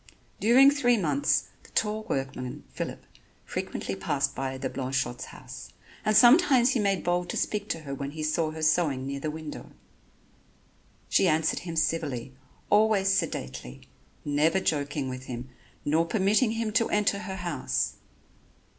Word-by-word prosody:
During 255 +6 +7
three 245 -4 +3
months, 145 -7 +1
the - - -18
tall 215 0 -1
workman, 130 -2 -3
Phillip, - - -5 0.4
frequently 95 - -4
passed 140 +6 -1
by 135 -1 -3
the 130 0 -3
Blanchotte's 130 -1 -2
house, - - -10 0.3
and 215 -1 +3
sometimes 260 -1 +6
he 260 - +1
made 195 -3 +1
bold 175 0 0
to - - -2
speak 210 0 -2
to 165 - -2
her 140 -2 -6
when 140 0 -4
he 155 +1 -6
saw 155 +1 +1
her 155 0 -6
sewing 155 -5 +2
near 140 0 -4
the 155 - -3
window. 155 0 -7 1.4
She 190 - +3
answered 160 -1 +2
him 170 -2 -6
civilly, 150 -6 -1 0.4
always 205 -2 +4
sedately, 65 - -3 0.4
never 150 +5 +2
joking 145 -5 -1
with 130 0 -6
him, 125 0 -6 0.4
nor 160 +3 +2
permitting 215 +4 +2
him 225 -1 -2
to 230 +1 +2
enter 205 -1 +1
her 200 -2 -5
house. 175 -8 -2
160 Hz, 150 wpm, -27 LUFS, 140-210 Hz, 1.4 s, During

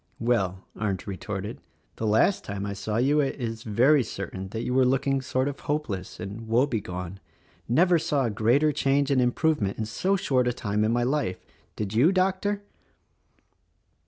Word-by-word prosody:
"Well," 95 -6 0
Arndt 100 -4 -2
retorted, 100 0 -5 0.4
"The 110 - -2
last 110 - +3
time 100 0 -4
I 100 - -3
saw 105 +2 -3
you 140 +5 +3
it 140 -2 +1
is 115 -2 -4
very 125 +7 +4
certain 95 -4 -6
that 110 +3 -4
you 125 - -2
were 130 0 +4
looking 135 +1 +1
sort 130 0 -1
of 140 -1 -4
hopeless 130 -12 -3
and 105 +3 -7
woebegone; 100 -7 -1 0.3
— - - -33
never 170 +7 +4
saw 145 -3 0
a 115 - 0
greater 120 +9 +3
change 140 0 +1
and 130 -2 +3
improve 150 +5 +1
ment 100 -1 -1
in 110 - -2
so 185 - 0
short 130 -9 +1
a 125 - +1
time 105 -2 -1
in 110 - +2
my 120 +1 +1
life, 130 -8 -1
— - - -36
did 105 -1 -4
you, 130 +11 +5
Doctor?" 195 +2 0
120 Hz, 185 wpm, -26 LUFS, 105-140 Hz, 0.4 s, you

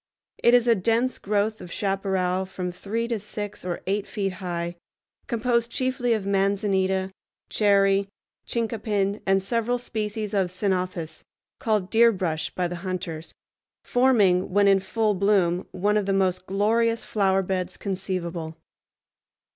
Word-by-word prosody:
It 240 - +5
is 245 -1 +3
a 235 - +6
dense 230 +5 +1
growth 210 +2 0
of 175 - -9
chaparral 190 -2 0
from 180 -1 -4
three 220 +6 -3
to 230 -3 -1
six 205 0 -6
or 180 -1 -3
eight 200 +1 -1
feet 195 -2 -2
high, 175 -1 -3 0.5
composed 235 0 +1
chiefly 255 -1 0
of 215 -3 -2
manzanita, 195 -1 +1 0.4
cherry, 195 -1 +3 0.4
chincapin, 215 -3 -1
and 195 0 +3
several 235 +3 0
species 215 -3 -4
of 195 -3 +2
ceanothus, 180 -4 -2 0.4
called 210 -4 0
deerbrush 190 -9 +3
by 180 -1 0
the 175 0 -5
hunters, 175 -3 -5 0.5
forming, 215 -8 +3
when 200 +2 +3
in 195 -1 +5
full 215 +3 0
bloom, 190 -3 +2
one 205 +3 +1
of 205 -2 -1
the 195 - +2
most 185 -1 0
glorious 225 +4 +1
flowerbeds 190 -2 0
conceivable. 180 -4 -4
195 Hz, 130 wpm, -25 LUFS, 185-220 Hz, 0.5 s, a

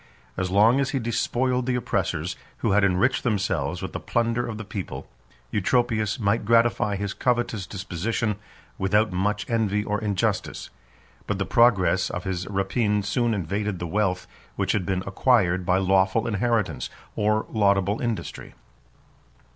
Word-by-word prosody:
10 95 - -1
As - - -3
long 110 +7 +5
as 135 -1 +1
he 140 - -1
despoiled 125 +2 0
the 125 - +1
oppressors, 125 - -1 0.3
who - - +3
had 105 +1 +4
enriched 100 +7 +2
themselves 95 - -1
with 95 - -5
the - - -3
plunder 120 0 0
of 110 -2 -5
the 110 - -7
people, 95 -1 -6 0.4
Eutropius 110 +1 +1
might 105 +1 +1
gratify 115 -2 +3
his 100 0 -3
covetous 120 -6 -1
disposition 100 +3 -2 0.4
without 105 +3 +2
much 100 +2 -1
envy 105 -3 +1
or 105 -1 -2
injustice: 100 -3 -2 0.6
but - - -1
the - - -1
progress 95 -6 +3
of 90 - -4
his 95 -1 -3
rapine 105 +1 0
soon 115 +2 0
invaded 100 +2 -2
the 85 - -4
wealth 95 0 0 0.3
which - - 0
had 95 -4 -1
been 95 -1 -1
acquired 95 -4 +2
by 90 0 +4
lawful 95 +2 +2
inheritance, 105 - 0 0.3
or 105 +1 +1
laudable 100 -1 +2
industry. 115 - -4
105 Hz, 150 wpm, -25 LUFS, 95-115 Hz, 0.6 s, long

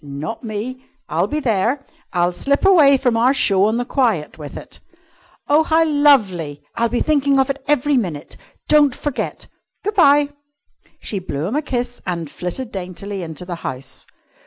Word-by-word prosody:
"Not 145 - -6
me! 230 +4 -5 0.3
I'll - - +1
be 305 - -2
there. 245 +2 0 0.3
I'll 175 0 +1
slip 280 - 0
away 305 -8 +6
from 250 -3 +1
our 250 +4 +3
show 195 -6 +3
on 220 +2 +1
the 245 - -1
quiet 230 - 0
with 145 -2 -8
it." - - -11 0.7
"Oh, 295 +2 +5
how 320 +1 +3
lovely! 205 - +2
I'll 235 0 0
be 245 - -1
thinking 285 -2 +2
of 265 +1 +2
it 275 -1 -7
every 290 -1 +2
minute. 170 -11 -3 0.3
Don't 295 -4 +4
forget. 290 -3 -4 0.4
Good 420 +2 -1
bye!" 290 -6 +5 0.7
She 200 - -3
blew 155 -5 -4
him 210 +9 -2
a 300 - +1
kiss 245 -4 -3
and 170 -4 -3
flitted 220 +7 -5
daintily 190 +1 -5
into 165 +1 -7
the 175 -1 -5
house. 130 0 -6
240 Hz, 170 wpm, -19 LUFS, 180-280 Hz, 0.7 s, away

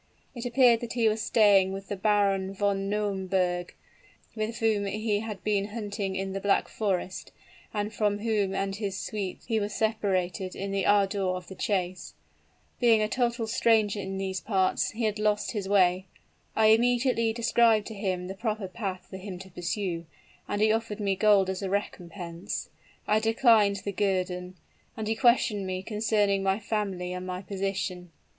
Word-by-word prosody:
It 245 0 -4
appeared 240 -1 +5
that 235 -1 -5
he 235 -2 +2
was 215 0 +1
staying 205 -4 +4
with 195 0 -7
the 205 - -3
Baron 195 -1 +1
von 195 -1 0
Nauemberg, 190 -4 -1 0.6
with 220 +1 -3
whom 215 -3 +1
he 210 +1 -1
had 210 -3 -6
been 205 -2 +1
out 210 - -13
hunting 205 -3 -3
in 190 0 -3
the 195 - -2
Black 200 0 +2
Forest, 190 -3 -3 0.4
and 210 0 -3
from 205 -1 +1
whom 205 -3 0
and 195 0 -1
his 200 -3 -3
suite 200 -3 -4
he 225 -2 0
was 205 0 -3
separated 190 -4 -1
in 195 +1 -4
the 195 -1 0
ardor 200 -1 +3
of 185 -1 -2
the - - -7
chase. 185 -2 -2 0.6
Being 230 -3 +4
a - - +1
total 240 0 0
stranger 220 -2 +2
in 190 0 -4
those 190 -1 -2
parts, 190 -4 +1
he 230 +1 -5
had 215 -1 0
lost 210 -1 +1
his 205 -4 -4
way. 185 -1 +3 0.5
I 220 -1 +5
immediately 240 0 +3
described 230 -2 +3
to 220 - -7
him 190 -3 -2
the 190 - -5
proper 215 -1 -3
path 185 -2 -5
for 190 - -8
him 190 -1 -7
to 190 +1 -11
pursue; 175 -1 -3 0.4
and 205 +1 0
he 215 - +4
offered 225 -1 -2
me 200 -2 0
gold 200 -1 +4
as 190 0 -3
a 195 - -2
recompense. 175 -3 -4 0.4
I 215 +1 +3
declined 220 -3 +4
the 200 - -1
guerdon; 185 -2 -1 0.4
and 220 -1 -3
he 220 - +2
questioned 225 -4 +2
me 185 0 -3
concerning 210 -2 +1
my 195 0 +1
family 200 -4 -3
and 180 0 -5
my 180 +1 -4
position. 190 -2 -3
200 Hz, 175 wpm, -28 LUFS, 190-220 Hz, 0.6 s, appeared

